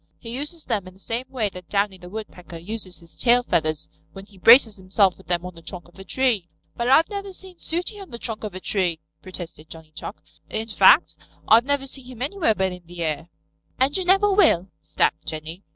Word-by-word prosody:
He 230 Hz, -, -9 dB
uses 295 Hz, +6 st, -4 dB
them 205 Hz, -6 st, -2 dB
in 185 Hz, -, -12 dB
the -, -, -20 dB
same 235 Hz, +5 st, -3 dB
way 225 Hz, -6 st, -1 dB
that 180 Hz, -2 st, -12 dB
Downy 200 Hz, -2 st, 0 dB
the 180 Hz, 0 st, -11 dB
Woodpecker 180 Hz, -5 st, -8 dB
uses 185 Hz, 0 st, -6 dB
his 165 Hz, 0 st, -16 dB
tail 245 Hz, 0 st, +4 dB
feathers 155 Hz, -8 st, 0 dB, 0.3 s
when 195 Hz, 0 st, -10 dB
he 200 Hz, -2 st, -19 dB
braces 225 Hz, +1 st, +7 dB
himself 190 Hz, 0 st, +2 dB
with 190 Hz, -, -19 dB
them 175 Hz, 0 st, -1 dB
on 180 Hz, -, -6 dB
the 165 Hz, -, -14 dB
trunk 175 Hz, +2 st, -7 dB
of 175 Hz, -, -19 dB
a -, -, -8 dB
tree." 220 Hz, -4 st, 0 dB, 0.3 s
"But 235 Hz, +1 st, -1 dB
I've 315 Hz, +5 st, +6 dB
never 400 Hz, -1 st, -5 dB
seen 370 Hz, -1 st, -11 dB
Sooty 360 Hz, +6 st, -3 dB
on 390 Hz, -, -10 dB
the 235 Hz, -, -7 dB
trunk 225 Hz, -2 st, -5 dB
of 205 Hz, -4 st, -5 dB
a -, -, -4 dB
tree," 180 Hz, -4 st, 0 dB, 0.2 s
protested 175 Hz, -4 st, -9 dB
Johnny 160 Hz, -1 st, -12 dB
Chuck. 160 Hz, +6 st, -8 dB, 0.3 s
"In 220 Hz, +1 st, -4 dB
fact, 210 Hz, -, +6 dB, 0.3 s
I've 230 Hz, +2 st, +6 dB
never 285 Hz, -1 st, 0 dB
seen 270 Hz, -2 st, -8 dB
him 250 Hz, -1 st, -6 dB
anywhere 300 Hz, -, +1 dB
but 190 Hz, -1 st, 0 dB
in 180 Hz, 0 st, -8 dB
the 175 Hz, 0 st, -5 dB
air." 160 Hz, +1 st, -3 dB, 0.5 s
"And 265 Hz, +2 st, +2 dB
you 380 Hz, -, +2 dB
never 390 Hz, +3 st, +4 dB
will," 190 Hz, -, +4 dB
snapped -, -, 0 dB
Jenny. 160 Hz, +3 st, -6 dB
205 Hz, 220 wpm, -24 LUFS, 180-255 Hz, 0.5 s, braces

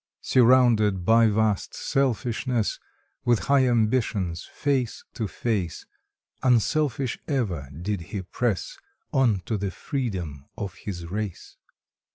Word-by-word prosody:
Surrounded 115 Hz, -7 st, +4 dB
by 115 Hz, 0 st, +6 dB
vast 110 Hz, -2 st, +1 dB
selfishness, 120 Hz, -2 st, 0 dB, 0.4 s
With 120 Hz, -1 st, +4 dB, 0.2 s
high 135 Hz, -2 st, +5 dB
ambitions 110 Hz, -7 st, +1 dB
face 135 Hz, -5 st, -1 dB
to 110 Hz, -, -2 dB
face, 100 Hz, -5 st, -2 dB, 0.6 s
Unselfish 130 Hz, +1 st, +1 dB
ever 95 Hz, -, -1 dB
did 85 Hz, +7 st, -3 dB
he 100 Hz, -3 st, -4 dB
press 100 Hz, +1 st, -2 dB, 0.3 s
On 120 Hz, -8 st, +3 dB
to 105 Hz, +4 st, -2 dB
the 100 Hz, 0 st, -1 dB
freedom 90 Hz, -, -4 dB
of 100 Hz, -4 st, -4 dB
his 90 Hz, -4 st, -6 dB
race. 100 Hz, +1 st, -5 dB
110 Hz, 110 wpm, -25 LUFS, 95-125 Hz, 0.6 s, by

